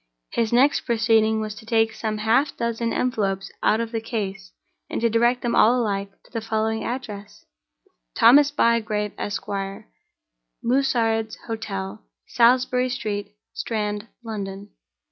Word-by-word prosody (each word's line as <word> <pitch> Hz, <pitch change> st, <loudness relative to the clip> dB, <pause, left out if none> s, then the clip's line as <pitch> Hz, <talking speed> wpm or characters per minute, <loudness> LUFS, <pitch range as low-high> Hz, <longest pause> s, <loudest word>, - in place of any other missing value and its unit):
His 230 Hz, -2 st, 0 dB
next 265 Hz, +5 st, +4 dB
proceeding 220 Hz, -2 st, +2 dB
was 215 Hz, -1 st, -4 dB
to 210 Hz, -, -12 dB
take 225 Hz, 0 st, +2 dB
some 215 Hz, -1 st, -3 dB
half 225 Hz, +7 st, +2 dB
dozen 235 Hz, 0 st, -1 dB
envelopes 200 Hz, -6 st, -1 dB
out 220 Hz, -, +3 dB
of 230 Hz, -1 st, -3 dB
the 225 Hz, -1 st, -2 dB
case, 195 Hz, -4 st, -4 dB, 0.4 s
and -, -, -2 dB
to 230 Hz, 0 st, +1 dB
direct 240 Hz, +2 st, +2 dB
them 240 Hz, -, 0 dB
all 240 Hz, +4 st, +5 dB
alike 200 Hz, -3 st, -1 dB
to -, -, -23 dB
the 230 Hz, -, -3 dB
following 220 Hz, 0 st, -1 dB
address: 215 Hz, -5 st, -6 dB, 0.7 s
"Thomas 280 Hz, +5 st, +7 dB
Bygrave, 215 Hz, -5 st, +1 dB
Esq., 205 Hz, +1 st, -3 dB, 1.2 s
Mussared's 230 Hz, -4 st, +1 dB
Hotel, 105 Hz, -, -5 dB, 0.2 s
Salisbury 250 Hz, +1 st, +3 dB
Street, 210 Hz, -4 st, -4 dB, 0.2 s
Strand, 210 Hz, -1 st, -3 dB, 0.2 s
London." 200 Hz, -2 st, -6 dB
225 Hz, 130 wpm, -23 LUFS, 210-235 Hz, 1.2 s, Thomas